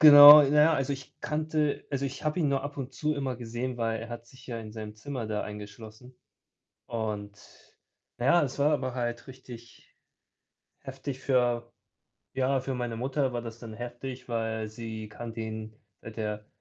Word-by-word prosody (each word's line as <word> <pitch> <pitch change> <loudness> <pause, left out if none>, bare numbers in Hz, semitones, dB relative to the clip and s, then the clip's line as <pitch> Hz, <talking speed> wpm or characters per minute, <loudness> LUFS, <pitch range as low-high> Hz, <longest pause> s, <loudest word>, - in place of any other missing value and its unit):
Genau, 145 0 +12
na 140 - +2 0.2
ja, 165 - +5
also 135 0 0
ich 135 -2 -9
kannte 155 -1 -1
also, 140 -1 -1
ich 135 +2 -5
habe 155 +3 0
ihn 150 - +2
nur 140 -1 +1
ab 145 +1 -6
und 135 -1 -5
zu 150 +4 -1
immer 135 -4 -2
gesehen, 120 +1 -4
weil 115 -1 -1
er 115 - -7
hat 120 0 -8
sich 130 +2 -17
ja 120 -2 -4
in 110 -1 -8
seinem 110 -1 -7
Zimmer 125 +1 -5
da 105 -1 -2
eingeschlossen. 110 +4 -10 0.7
Und, 105 -3 -4 0.8
na 120 - -2
ja, 170 +4 +5
es 135 -2 -4
war 145 +2 +4
aber 130 -4 -1
halt 120 0 -3
richtig 120 -3 -13 0.8
heftig 135 0 -6
für 120 -3 +1 0.6
ja, 135 +1 +1
für 130 +1 -3
meine 120 -2 -3
Mutter 130 +2 0
war 120 -1 -3
das 115 -1 -8
dann 115 -2 -9
heftig, 125 +2 -7
weil 110 -2 -2
sie 110 0 -7
kannte 115 +1 -7
ihn, 110 0 -5 0.3
seit 110 0 -10
er 105 -1 -3
120 Hz, 180 wpm, -29 LUFS, 115-135 Hz, 0.8 s, Genau